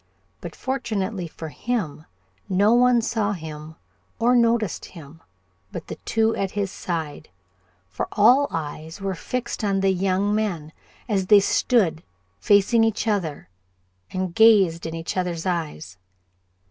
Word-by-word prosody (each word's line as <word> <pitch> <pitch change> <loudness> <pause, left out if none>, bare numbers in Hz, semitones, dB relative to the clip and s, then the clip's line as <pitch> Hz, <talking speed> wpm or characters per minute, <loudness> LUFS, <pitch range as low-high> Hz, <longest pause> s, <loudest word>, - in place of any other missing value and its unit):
But 170 - -8
fortunately 210 -8 -3
for 160 0 -8
him, 170 -7 -3 0.4
no 200 +4 +3
one 245 -1 +4
saw 215 -3 0
him 155 -3 -8 0.4
or 240 +2 +3
noticed 230 -4 +1
him 160 -1 -13 0.5
but 170 - -7
the - - -7
two 225 0 +1
at 195 - -1
his 200 -2 -1
side, 160 -4 -5 0.6
for 95 -1 -4
all 250 +7 +5
eyes 160 +1 -6
were 195 -1 -2
fixed 240 +6 -4
on 195 -2 +1
the 195 0 +3
young 195 +2 0
men, 175 -8 -2 0.3
as 195 -5 0
they 205 +1 +8
stood 195 -5 +1 0.4
facing 205 +3 +4
each 225 0 0
other 185 -9 -2 0.6
and 185 -2 -3
gazed 195 -7 +5
in 160 - -5
each 165 0 -5
other's 180 -2 -2
eyes. 150 - -4
190 Hz, 135 wpm, -23 LUFS, 165-220 Hz, 0.6 s, they